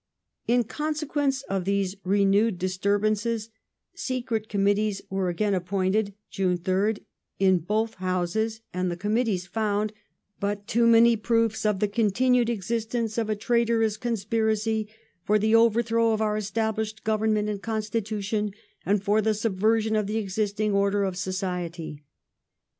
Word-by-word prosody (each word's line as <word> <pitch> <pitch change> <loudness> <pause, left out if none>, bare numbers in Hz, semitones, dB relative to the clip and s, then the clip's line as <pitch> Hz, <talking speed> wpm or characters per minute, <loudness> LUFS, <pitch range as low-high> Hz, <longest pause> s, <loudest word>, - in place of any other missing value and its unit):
In 245 +1 +3
consequence 290 0 -2
of 195 -6 -2
these 195 0 0
renewed 200 +2 +3
disturbances 210 +4 0 0.4
Secret 240 -4 -3
Committees 205 0 +1
were 190 -1 0
again 200 +4 0
appointed 190 +2 0 0.2
(June 185 -2 0
3rd) 190 +4 0 0.3
in 190 -2 +4
both 215 +6 -1
Houses, 185 +4 -1
and 180 0 -1
the 175 - -4
Com 205 +4 -2
mittees 215 -6 0
found 215 -1 -1 0.2
'* - - -53
but 200 0 -2
too 230 +1 +2
many 230 0 +6
proofs 225 -1 +1
of 210 -3 +1
the 210 - +2
continued 235 +3 +2
existence 225 +1 -2
of 225 -1 -1
a 215 - +1
traitorous 230 0 +1
conspiracy 220 -1 -1 0.4
for 210 +4 +3
the 215 +1 +1
overthrow 230 0 +4
of 215 - -1
our 215 -1 +1
established 220 0 -2
govern 220 0 +1
ment 210 0 0
and 205 -2 -3
constitution 215 -1 -2 0.3
and 200 0 +1
for 210 +2 +3
the 215 0 +1
subversion 220 +1 +1
of 210 -2 +1
the 215 +2 -1
existing 210 0 -1
order 200 0 +2
of 190 -2 -1
society". 180 -5 -4
215 Hz, 140 wpm, -26 LUFS, 195-225 Hz, 0.4 s, many